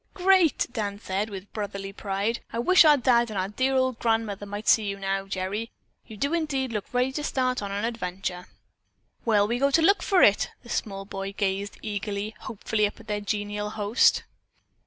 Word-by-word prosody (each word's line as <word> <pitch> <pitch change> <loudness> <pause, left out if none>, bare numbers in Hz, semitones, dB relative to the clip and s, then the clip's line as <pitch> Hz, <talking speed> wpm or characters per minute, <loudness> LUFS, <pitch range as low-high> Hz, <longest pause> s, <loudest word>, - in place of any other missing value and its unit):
"Great!" 375 -4 +4
Dan 205 -3 -3
said 200 +1 -2
with 195 -1 -9
brotherly 200 -2 -5
pride. 200 +3 -2
"I - - -4
wish 345 +9 +6
our 300 -1 +7
dad 240 -2 +3
and 200 0 -3
dear 265 +1 +1
old 260 -2 +1
grandmother 225 -3 -1
might 205 +1 -6
see 220 - +5
you 200 0 -3
now, 195 0 -2
Gerry. 195 +4 -3 0.4
You 220 -2 -10
do 280 +8 -1
indeed 275 -7 -1
look 210 -2 -4
ready 250 +1 +1
to 295 +3 -4
start 255 -4 0
on 200 -1 -4
an 200 +2 -2
adventure." 185 -5 -4 0.8
"Where'll 210 -3 +3
we 240 +2 -1
go 275 +1 +3
to 300 +4 +3
look 390 +2 +4
for 380 -1 +3
it?" 205 - +4
The 240 - -14
small 195 -4 -3
boy 195 0 -5
gazed 200 0 -2
eagerly, 205 0 -3
hopefully 210 0 -1
up 205 - -11
at 225 - -14
their 210 -1 -2
genial 205 +1 -3
host. 210 +2 +3
210 Hz, 190 wpm, -26 LUFS, 200-250 Hz, 0.8 s, our